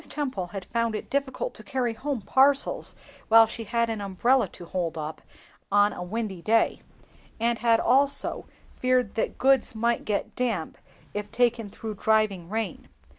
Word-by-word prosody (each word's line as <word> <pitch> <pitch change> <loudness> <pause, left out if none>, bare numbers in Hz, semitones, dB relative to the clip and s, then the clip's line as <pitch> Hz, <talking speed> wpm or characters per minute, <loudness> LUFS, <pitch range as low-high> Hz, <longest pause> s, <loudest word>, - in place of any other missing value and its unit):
Temple 260 -12 -3
had 190 +1 -7
found 230 -1 -1
it - - -6
difficult 280 - -2
to - - -10
carry 255 -4 -1
home 260 -1 -4
parcels 280 - +3 0.3
when 225 0 +8
she 225 +1 -6
had 235 +2 +1
an 225 -2 -3
umbrella 205 +5 +2
to 175 - -12
hold 170 -2 -3
up 155 0 -5 0.5
on 205 +1 +4
a - - -7
windy 195 0 -4
day, 225 +5 +2 0.6
and 230 0 +1
had 230 0 +4
also 275 +3 +1 0.3
feared 255 -4 +1
that 220 - -2
goods 265 -3 +3
might 235 +2 0
get 210 -2 -2
damp 225 -10 -2 0.3
if 210 0 -5
taken 230 -2 +1
through 220 +2 -6
driving 205 -4 +1
rain. 220 +1 -4
225 Hz, 160 wpm, -26 LUFS, 205-250 Hz, 0.6 s, when